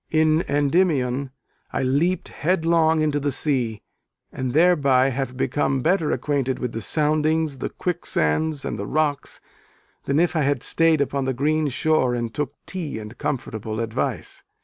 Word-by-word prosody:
In 155 0 +3
Endymion 140 -3 +1 0.4
I - - -1
leaped 160 +8 +1
headlong 165 -1 +2
into 150 -1 +1
the 145 0 -1
sea, 125 -7 0 0.5
and 130 -1 -3
thereby 140 -6 +4
have 130 -1 -3
become 135 0 0
better 165 +1 +1
acquainted 135 -3 -1
with 125 - -3
the 115 - -5
soundings, 155 +1 0
the - - -3
quicksands, 155 - -1
and - - -4
the 100 - -4
rocks, 145 -1 -1 0.6
than 140 +2 +1
if 175 0 +2
I 155 - +2
had 140 -3 0
stayed 165 -2 +2
upon 140 -1 -1
the 130 -1 -1
green 155 +3 +1
shore 135 -2 +1
and 120 -1 -3
took 150 -3 -3
tea 170 - -4
and 105 0 -8
comfortable 110 -5 -3
advice. 115 -1 -3
145 Hz, 150 wpm, -23 LUFS, 130-155 Hz, 0.6 s, thereby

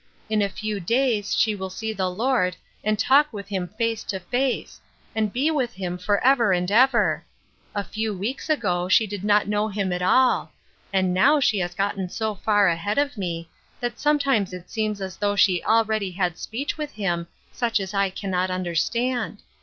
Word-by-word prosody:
" - - -33
In 215 -1 +2
a 200 - +1
few 210 +1 -4
days 230 +1 +1
she 220 - +3
will 190 -2 -5
see 220 +4 -4
the 190 -3 -1
Lord, 195 -2 +1 0.3
and 215 0 +1
talk 285 +7 +4
with 200 -3 -8
Him 190 -3 -2
face 230 -1 0
to 190 - -3
face; 245 +8 -2 0.3
and 215 -2 0
be 275 +8 +1
with 265 -6 -1
Him 180 -1 -4
forever 210 +4 +3
and 180 +1 +1
ever! 245 +2 +4 0.5
A 205 - 0
few 220 +2 -3
weeks 210 +10 -4
ago 180 - 0
she 220 - +5
did 205 -2 -6
not 205 0 +3
know 210 +1 +1
Him 200 -3 -2
at 180 - -2
all; 250 +8 +3 0.4
and 190 -2 +1
now 285 +11 +5
she 220 -7 +2
has 175 -1 -3
gotten 195 -1 -1
so 220 +3 -2
far 205 0 +2
ahead 170 +6 0
of 285 -1 +1
me, 170 -5 -4 0.3
that 240 0 -3
sometimes 275 -10 +2
it 180 - -6
almost - - -18
seems 215 -2 -1
as 190 -1 -5
though 205 0 0
she 185 -3 +3
already 220 -3 +2
had 180 -2 -1
speech 275 +7 -4
with 300 -1 -4
Him 175 -5 -2 0.2
such 235 -3 0
as 190 0 -5
I 195 -1 +2
cannot 185 -1 -2
understand. 210 +7 -1
205 Hz, 195 wpm, -24 LUFS, 185-230 Hz, 0.5 s, she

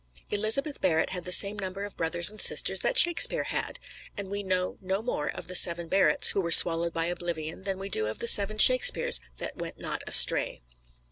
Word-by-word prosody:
Elizabeth 225 +8 -2
Barrett 160 -4 -1
had 180 -2 -6
the 180 - -6
same 200 +2 +5
number 195 0 -7
of 205 - -10
brothers 170 +3 -1
and 215 - -6
sisters - - 0
that - - -3
Shakespeare 345 +7 +3
had; - - -5 0.4
and 200 -1 -8
we 200 0 -5
know 185 -2 -4
no 190 +2 -5
more 150 -11 -5
of - - -9
the 185 - -8
seven 170 -1 0
Barretts 195 +4 +2
who 195 - -2
were 170 -2 -6
swallowed 170 0 +7
by 165 0 -4
oblivion 170 0 -7
than 195 -1 -5
we 195 +1 -8
do 110 - -3
of 110 - -7
the 235 - -6
seven 210 -1 0
Shakespeares 255 +3 +4 0.2
that - - -9
went - - -9
not - - -7
astray. - - +2
190 Hz, 205 wpm, -25 LUFS, 170-205 Hz, 0.4 s, swallowed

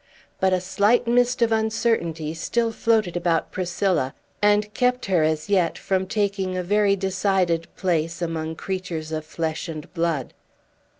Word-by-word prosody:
But 190 0 +3
a 185 - +2
slight 205 +6 +2
mist 245 +1 +3
of 230 - +2
uncertainty 220 -8 0
still 230 +8 0
floated 220 -5 +1
about 170 -2 0
Priscilla, 175 -6 0 0.3
and 210 0 +3
kept 250 0 +1
her, 185 -4 +2
as 155 +2 0
yet, 185 -5 +2
from 190 -1 -1
taking 195 -2 -1
a 180 - -1
very 205 +2 +3
decided 190 -3 0
place 170 -3 -1
among 160 -2 -3
creatures 175 -4 -4
of 155 -1 -2
flesh 160 +1 -3
and 155 -2 -7
blood. 165 -6 -1
185 Hz, 145 wpm, -24 LUFS, 165-210 Hz, 0.3 s, But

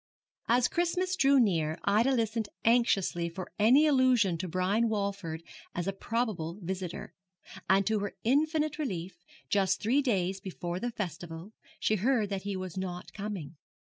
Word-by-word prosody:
As 245 +1 +4
Christmas 360 +2 0
drew 275 -5 +5
near 165 -8 +2
Ida 220 +7 +3
listened 225 -3 0 0.2
anxiously 200 -7 +2
for 180 +2 -7
any 255 +9 +6
allusion 255 - +4
to 185 - -3
Brian 190 +6 +1
Walford 200 -6 -3 0.3
as 175 - -2
a 195 - 0
probable 195 -6 -2
visitor; 185 -1 -5 0.6
and 195 +1 +4
to 220 +1 +1
her 205 0 -4
infinite 305 +4 +1
relief, 190 - -3 0.3
just 195 -2 +2
three 250 +7 +2
days 190 -7 0
before 180 -2 -4
the 245 - -2
festival, 175 - -6 0.3
she 215 - +1
heard 220 0 +1
that 195 -1 -2
he 200 0 -3
was 185 -1 -6
not 180 -1 -5
coming. 195 -7 -6
200 Hz, 150 wpm, -30 LUFS, 180-240 Hz, 0.6 s, any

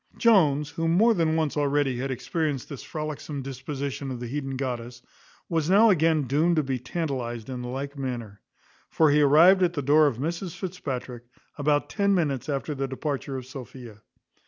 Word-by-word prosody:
Jones, 150 - +3
who 165 +2 -2
more 210 +8 +4
than 165 -5 +1
once 160 -3 0
already 145 -3 +1
had 135 +2 -2
experienced 145 +1 -2
this 140 -4 -7
frolicsome 150 -2 -5
disposition 135 +1 -5
of 125 -2 -5
the 120 - -5
heathen 135 +1 -4
goddess, 120 -2 -5 0.4
was 165 -1 -1
now 210 +4 +6
again 160 -3 +3
doomed 155 +6 +2
to 155 - +2
be 130 -2 -2
tantalized 125 -4 -4
in 125 -1 -5
the 125 - -5
like 140 +3 -5
manner; 120 -7 -5 0.5
for 160 -2 +3
he 150 +1 +4
arrived 165 +7 +6
at 175 -1 +2
the 145 - -2
door 150 +3 +5
of 130 -6 -1
Mrs 170 +5 -4
Fitzpatrick 130 -10 -5 0.3
about 145 0 +1
ten 200 -1 +1
minutes 145 -6 -1
after 145 +2 -2
the 135 -1 -3
departure 135 0 -4
of 130 - -7
Sophia. 125 -4 -10
145 Hz, 180 wpm, -26 LUFS, 130-160 Hz, 0.5 s, now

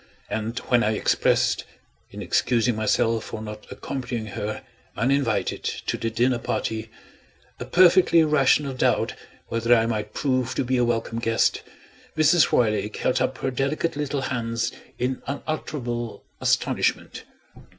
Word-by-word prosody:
And 110 +2 -3
when 120 -2 +2
I 110 - +1
expressed - - +2 0.5
(in - - -7
excusing 120 -1 +1
myself 110 +1 +1
for - - -6
not 105 0 -8
accompanying 125 -4 -4
her, 105 +1 -4 0.3
uninvited, 130 +2 0
to - - -3
the 115 - -2
dinner 120 +2 +1
party) 110 -1 -3 0.7
a - - -5
perfectly 175 -2 +5
rational 145 -2 +3
doubt 130 - +1 0.4
whether 115 +1 +3
I 115 -1 +3
might 110 -2 -3
prove 130 -3 0
to - - 0
be 130 +1 0
a 125 - +3
welcome 115 -1 -1
guest, 115 -1 +1 0.6
Mrs. 155 +1 +5
Roylake 110 -2 +1
held 125 - +1
up 130 +1 0
her 135 - -2
delicate 140 +5 -1
little 145 -1 -2
hands 120 -2 -2 0.3
in 125 +1 -2
unutterable 130 -5 -4 0.2
astonishment. - - 0
120 Hz, 135 wpm, -24 LUFS, 115-135 Hz, 0.7 s, perfectly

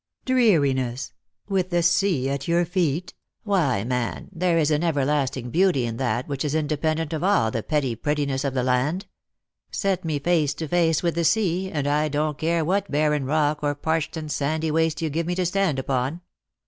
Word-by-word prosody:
" - - -48
Dreariness! 140 - +2 0.3
with 190 -3 0
the 175 -1 +1
sea 170 -6 +2
at 140 0 -3
your 170 +1 +2
feet? 175 -1 -1 0.3
Why, 165 - +1
man, 125 0 -3
there 175 -1 +1
is 155 -1 +2
an 150 +2 +1
everlasting 140 -5 0
beauty 175 -6 +3
in 115 -1 -4
that 120 -1 -1
which 140 -2 -3
is 150 0 -1
independent 155 +1 -1
of 160 - -2
all 185 - +3
the 115 - -2
petty 135 -3 -1
prettiness 140 +1 -1
of 135 -2 -2
the 130 - +1
land. 130 +9 0 0.6
Set 195 -3 -1
me 160 -3 -1
face 150 -2 +1
to 160 - -4
face 165 -1 +2
with 170 -1 +1
the 170 - -1
sea,, 190 -1 +1
and 145 -6 -2
I 150 +1 +2
don't 150 0 -1
care 165 0 +1
what 195 +4 0
barren 150 -1 +1
rock 150 +1 +1
or 145 -1 0
parched 160 +2 -1
and 155 -1 -5
sandy 155 +3 -1
waste 160 0 +1
yon 160 - -1
give 165 +3 -2
me 175 - -1
to 185 0 0
stand 185 -4 +1
upon. 130 +4 -2
155 Hz, 195 wpm, -24 LUFS, 140-170 Hz, 0.6 s, beauty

